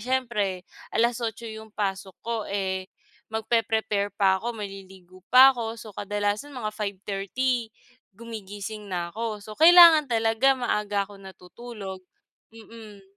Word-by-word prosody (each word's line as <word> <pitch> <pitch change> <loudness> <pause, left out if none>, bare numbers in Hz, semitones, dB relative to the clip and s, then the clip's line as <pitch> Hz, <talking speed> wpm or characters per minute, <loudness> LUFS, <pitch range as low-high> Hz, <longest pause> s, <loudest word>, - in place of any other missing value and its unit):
siyempre 210 -7 -1 0.3
alas 235 +1 +2
otso 230 0 -4
'yong 220 0 -9
pasok 195 -2 -3
ko, 235 0 -2
eh, 190 -2 -2 0.4
magpeprepare 220 -2 0
pa 190 -2 +3
ako, 235 +1 -4
maliligo 190 -2 -11
pa 260 +2 +9
ako. 225 -2 -4
So 220 - -10
kadalasan 205 +6 -2
mga 215 -4 -3
5:30 210 +4 -2 0.4
gumigising 210 -1 -8
na 175 -1 -3
ako. 220 -2 -4
So 215 - -11
kailangan 330 -2 +9
talaga 225 +4 +3
maaga 210 -4 0
ako 200 -1 -14
natutulog. 190 +1 -10 0.6
Mm. 220 -2 -13
215 Hz, 125 wpm, -25 LUFS, 195-230 Hz, 0.6 s, pa